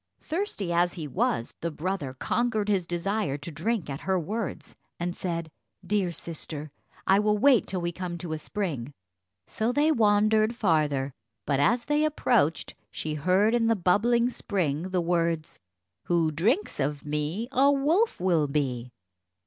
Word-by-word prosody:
Thirsty 310 Hz, -, -2 dB
as 175 Hz, +1 st, +2 dB
he 160 Hz, -4 st, -5 dB
was, 120 Hz, -3 st, -1 dB
the 170 Hz, -, -1 dB
brother 160 Hz, -3 st, -3 dB
conquered 220 Hz, -, 0 dB
his 190 Hz, -4 st, +1 dB
desire 175 Hz, -3 st, -1 dB
to 145 Hz, +4 st, -7 dB
drink 215 Hz, +5 st, -1 dB
at 140 Hz, -1 st, -5 dB
her 190 Hz, -1 st, 0 dB
words, 210 Hz, +5 st, -4 dB, 0.2 s
and 175 Hz, +1 st, -2 dB
said, 170 Hz, -3 st, -3 dB, 0.4 s
"Dear 195 Hz, -1 st, +1 dB
sister, 155 Hz, -2 st, -7 dB, 0.3 s
I 195 Hz, +1 st, +5 dB
will 210 Hz, 0 st, +2 dB
wait 255 Hz, 0 st, +4 dB
till 185 Hz, -2 st, -3 dB
we 170 Hz, 0 st, -1 dB
come 175 Hz, 0 st, -5 dB
to 170 Hz, -1 st, -5 dB
a 155 Hz, -, -3 dB
spring." 150 Hz, -, -4 dB, 0.5 s
So 220 Hz, +2 st, -1 dB
they 295 Hz, +4 st, +3 dB
wandered 215 Hz, -1 st, +3 dB
farther, 150 Hz, -, +1 dB, 0.3 s
but 140 Hz, -1 st, +1 dB
as 235 Hz, -, +2 dB
they 295 Hz, +1 st, +2 dB
approached, 235 Hz, -, +1 dB, 0.2 s
she 155 Hz, -, -4 dB
heard 185 Hz, +8 st, +2 dB
in 235 Hz, -1 st, +2 dB
the 230 Hz, -, +4 dB
bubbling 225 Hz, +6 st, +3 dB
spring 175 Hz, -, -2 dB
the 185 Hz, -1 st, 0 dB
words 170 Hz, -2 st, -1 dB, 0.5 s
"Who 170 Hz, -2 st, +2 dB
drinks 220 Hz, -, 0 dB
of 145 Hz, +1 st, -2 dB
me, 150 Hz, +9 st, -2 dB
a 275 Hz, +2 st, +5 dB
wolf 315 Hz, +11 st, +2 dB
will 170 Hz, -5 st, +2 dB
be." 130 Hz, -4 st, -1 dB
180 Hz, 155 wpm, -27 LUFS, 155-220 Hz, 0.5 s, I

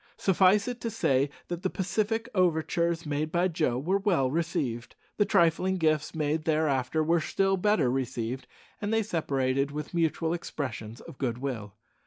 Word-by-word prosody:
Suffice 190 Hz, +2 st, +4 dB
it 245 Hz, -1 st, -4 dB
to 230 Hz, -, -2 dB
say 140 Hz, -, +1 dB, 0.2 s
that 175 Hz, -1 st, -4 dB
the 190 Hz, -, 0 dB
pacific 215 Hz, +6 st, -1 dB
overtures 170 Hz, -2 st, +1 dB
made 150 Hz, +1 st, -2 dB
by 175 Hz, +2 st, +2 dB
Joe 155 Hz, -8 st, 0 dB
were 180 Hz, +9 st, +1 dB
well 175 Hz, -11 st, +1 dB
received, 150 Hz, -7 st, -2 dB, 0.2 s
the 205 Hz, -, +4 dB
trifling 175 Hz, +2 st, +3 dB
gifts 155 Hz, -2 st, +1 dB
made 155 Hz, 0 st, -1 dB
thereafter 155 Hz, -2 st, +1 dB
were 165 Hz, +1 st, +2 dB
still 195 Hz, +4 st, +1 dB
better 195 Hz, -, +2 dB
received, 125 Hz, -1 st, -3 dB, 0.3 s
and 205 Hz, 0 st, -2 dB
they 225 Hz, 0 st, +2 dB
separated 140 Hz, -7 st, 0 dB
with 150 Hz, +2 st, -6 dB
mutual 165 Hz, -1 st, +1 dB
expressions 120 Hz, -9 st, -5 dB
of -, -, -12 dB
good 120 Hz, -3 st, -1 dB
will. 115 Hz, -7 st, -5 dB
160 Hz, 160 wpm, -28 LUFS, 135-185 Hz, 0.3 s, Suffice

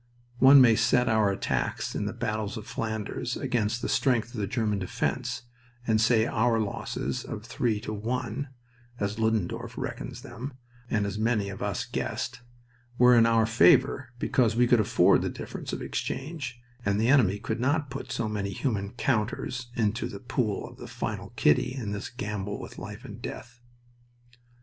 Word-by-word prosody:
One 135 Hz, +1 st, +9 dB
may 115 Hz, -3 st, +7 dB
set 120 Hz, +2 st, +3 dB
our 110 Hz, -2 st, +3 dB
attacks 100 Hz, -, -1 dB
in -, -, -2 dB
the -, -, -1 dB
battles 110 Hz, -1 st, -3 dB
of 105 Hz, -, -7 dB
Flanders 115 Hz, +1 st, -3 dB
against 120 Hz, -3 st, -1 dB
the -, -, 0 dB
strength 120 Hz, -4 st, +1 dB
of 120 Hz, -, -5 dB
the 100 Hz, -, -1 dB
German 105 Hz, -2 st, 0 dB
defense, 95 Hz, +5 st, -2 dB, 0.4 s
and 110 Hz, -2 st, +3 dB
say 115 Hz, -1 st, +4 dB
our 115 Hz, 0 st, +2 dB
losses 105 Hz, -2 st, -3 dB
of 105 Hz, -, -7 dB
three 115 Hz, -2 st, 0 dB
to 110 Hz, -, -4 dB
one 120 Hz, +4 st, -3 dB, 0.5 s
(as 100 Hz, +2 st, -2 dB
Ludendorff 110 Hz, -5 st, -1 dB
reckons -, -, -5 dB
them, 125 Hz, +4 st, -7 dB, 0.4 s
and 105 Hz, -2 st, +1 dB
as 100 Hz, +1 st, -3 dB
many 110 Hz, -3 st, +1 dB
of 100 Hz, -, -7 dB
us -, -, -1 dB
guessed) -, -, -3 dB, 0.6 s
were 125 Hz, 0 st, +7 dB
in 115 Hz, -1 st, +6 dB
our 115 Hz, -1 st, +4 dB
favor, 115 Hz, +4 st, +4 dB
because 115 Hz, -2 st, +2 dB
we 125 Hz, +1 st, +5 dB
could 120 Hz, -1 st, +4 dB
afford 105 Hz, -4 st, +4 dB
the -, -, -1 dB
difference -, -, -6 dB
of -, -, -4 dB
exchange 135 Hz, -4 st, -4 dB, 0.2 s
and 100 Hz, -1 st, +1 dB
the 115 Hz, -, +2 dB
enemy 115 Hz, -9 st, +5 dB
could 110 Hz, +3 st, -3 dB
not 145 Hz, +3 st, +1 dB
put -, -, -6 dB
so 115 Hz, -, -1 dB
many 105 Hz, -2 st, -2 dB
human 100 Hz, -4 st, -2 dB
counters 125 Hz, 0 st, -1 dB
into 110 Hz, +1 st, 0 dB
the 100 Hz, -, -8 dB
pool 115 Hz, -3 st, -1 dB
for -, -, -17 dB
the -, -, -7 dB
final -, -, -4 dB
"kitty" 75 Hz, -, +3 dB
in 115 Hz, -6 st, -4 dB
this 100 Hz, -1 st, -4 dB
gamble 105 Hz, -5 st, -4 dB
with -, -, -9 dB
life -, -, -8 dB
and -, -, -9 dB
death. 120 Hz, 0 st, -8 dB
115 Hz, 175 wpm, -28 LUFS, 105-125 Hz, 0.6 s, One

